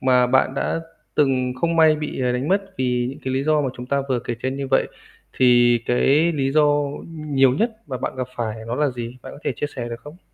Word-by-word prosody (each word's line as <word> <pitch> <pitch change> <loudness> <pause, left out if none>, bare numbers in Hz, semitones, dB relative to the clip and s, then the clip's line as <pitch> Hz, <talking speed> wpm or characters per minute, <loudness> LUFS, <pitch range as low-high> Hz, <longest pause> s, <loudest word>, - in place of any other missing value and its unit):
mà 125 -1 +4
bạn 130 +1 +2
đã 165 - -1 0.3
từng 130 -3 +2
không 170 0 +1
may 160 -1 +6
bị, 150 -3 -4
ờ, 125 -1 +1
đánh 125 +4 -2
mất 195 +1 +2 0.2
vì 125 -1 0
những 135 - -10
cái 130 0 -1
lý 135 - 0
do 155 0 +3
mà 140 - 0
chúng 125 - -7
ta 140 +1 0
vừa 130 -2 +1
kể 120 - -4
trên 130 +1 -2
như 140 0 -3
vậy, 135 - +3 0.5
thì 120 -1 +5
cái 145 +7 +3
lý 135 -3 0
do 155 0 +5 0.5
nhiều 145 -5 +2
nhất 225 - +1 0.2
mà 130 - -4
bạn 125 - -4
gặp 130 -1 -2
phải 110 -2 -3
đó 120 - -1
là 150 +3 +1
gì? 120 0 -6
Bạn - - -9
có - - -11
thể - - 0
chia - - -2
sẻ 120 -2 -4
được 115 0 -7
không? 150 +6 -12
130 Hz, 250 wpm, -22 LUFS, 125-150 Hz, 0.5 s, may